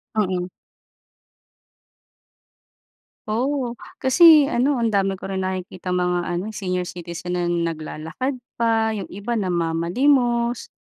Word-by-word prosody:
Mm. 185 -4 0 2.8
Oo, 250 +3 -1 0.2
kasi 310 +2 +7
ano, 275 +1 +1
ang 230 -2 0
dami 195 -1 +1
ko - - -9
rin 190 0 -3
nakikitang 185 -1 -3
mga 180 0 +1 0.2
ano, 210 +5 -4
senior 180 -3 -2
citizen 175 0 -6
na 175 -1 0 0.2
naglalakad 160 - -5 0.2
pa, 225 -1 +1
yung 205 -3 -5
iba 205 +5 -4
namamalimos, 235 - +1
200 Hz, 105 wpm, -22 LUFS, 180-240 Hz, 2.8 s, kasi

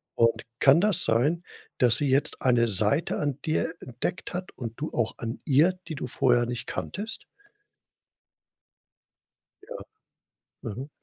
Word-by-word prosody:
Und 115 0 +2 0.2
kann 145 +5 +6
das 210 -4 +3
sein, 145 +10 +2 0.4
dass 120 -2 +5
sie 145 - 0
jetzt 135 +2 +1
eine 120 -2 +3
Seite 110 - +1
an 145 -2 -2
dir 160 +1 -1
entdeckt 125 +10 -4
hat 180 +1 -5
und 115 -3 -5
du 155 - -3
auch 115 -2 -1
an 115 0 -5
ihr, 155 +7 +4
die 160 - -5
du 140 - -5
vorher 120 -1 +2
nicht 120 -1 -4
kanntest? 220 +3 -5 2.4
Ja. - - -7 0.9
Mhm. 125 +4 -6
130 Hz, 135 wpm, -27 LUFS, 120-160 Hz, 2.4 s, kann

